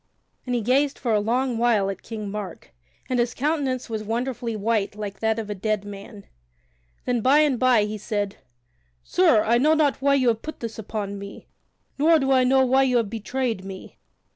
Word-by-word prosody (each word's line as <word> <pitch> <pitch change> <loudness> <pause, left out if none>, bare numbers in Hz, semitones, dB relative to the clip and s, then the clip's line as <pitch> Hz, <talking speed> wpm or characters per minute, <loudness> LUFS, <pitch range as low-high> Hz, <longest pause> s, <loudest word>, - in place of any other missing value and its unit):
And 250 - 0
he 240 - 0
gazed 270 +5 +1
for 235 -3 -1
a 210 - +3
long 240 +3 0
while 230 -5 +2
at 195 - -9
King 215 -3 -6
Mark, 200 -4 -7 0.3
and 255 -1 0
his 240 0 0
countenance 275 -3 -1
was 220 -2 -4
wonderfully 235 +1 -3
white 215 -1 -1
like 205 -2 -6
that 220 0 0
of 225 -2 -4
a 210 - -3
dead 205 +1 -2
man. 200 0 -10 0.8
Then 245 -2 0
by 275 +6 +5
and 285 -5 +2
by 250 -4 +4
he 210 0 -4
said: 205 -2 -3 0.7
"Sir, 185 - +3
I 235 +2 +3
know 305 +4 +4
not 295 -4 +1
why 280 0 +3
you 255 -3 +3
have 225 -1 -1
put 310 - -7
this 225 -2 -6
upon 200 -2 -5
me, 200 0 -10 0.5
nor 320 +3 +5
do 270 -2 0
I 260 -1 +5
know 265 +1 +4
why 265 +1 +3
you 255 -2 +3
have 225 -4 -1
betrayed 230 -1 -3
me. 190 -1 -10
230 Hz, 200 wpm, -24 LUFS, 210-260 Hz, 0.8 s, by